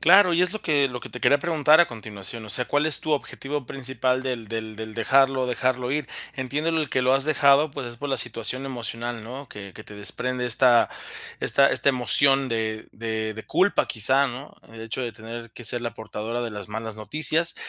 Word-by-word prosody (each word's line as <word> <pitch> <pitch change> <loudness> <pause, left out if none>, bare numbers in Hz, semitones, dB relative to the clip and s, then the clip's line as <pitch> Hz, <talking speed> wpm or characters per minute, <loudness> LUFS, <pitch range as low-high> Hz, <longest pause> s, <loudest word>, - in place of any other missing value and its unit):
Claro, 185 +1 +6
y 170 - +2
es 180 +3 +3
lo 215 - -5
que 145 -3 +2
lo 125 -1 -6
que - - -10
te 125 - -8
quería 145 - +4
preguntar 155 -1 +4
a 175 - +5
continuación, 110 0 -6
o - - -11
sea, 125 - +3
¿cuál 145 +3 +1
es 155 - +1
tu 155 - -3
objetivo 140 -1 -3
principal 130 -1 -2
del 125 -5 -4
del 110 -1 -5
del 110 0 -7
dejarlo 135 +3 +3
dejarlo 125 +1 -1
ir? 150 -2 -2 0.3
Entiendo 145 +5 -2
el 160 -3 0
que 130 - 0
lo 130 +1 +3
has 135 +1 +3
dejado, 145 0 +4
pues, 135 -2 -6
es 120 - -8
por 145 - -5
la 135 - 0
situación 125 +3 -4
emocional, 120 -2 -4
¿no?, 130 +5 -8
que 100 -2 -10
que 105 - -11
te 105 - -12
desprende 125 +4 -3
esta 120 0 +5 0.5
esta 140 0 +5
esta 140 - +3
emoción 135 +1 +2
de 110 -1 -3
de 110 0 -3
de 110 - -9
culpa 200 +2 +2
quizá, 130 +5 +3
¿no?, 130 +3 -8 0.2
el 115 - -10
hecho 115 +3 -4
de 120 -2 -4
tener 115 +1 -9
que 120 - -11
ser 120 +1 +2
la 120 -2 -3
portadora 110 +1 -5
de 120 -1 -3
las 105 -2 -8
malas 110 0 -5
noticias. 155 +9 +1
125 Hz, 215 wpm, -24 LUFS, 115-140 Hz, 0.5 s, Claro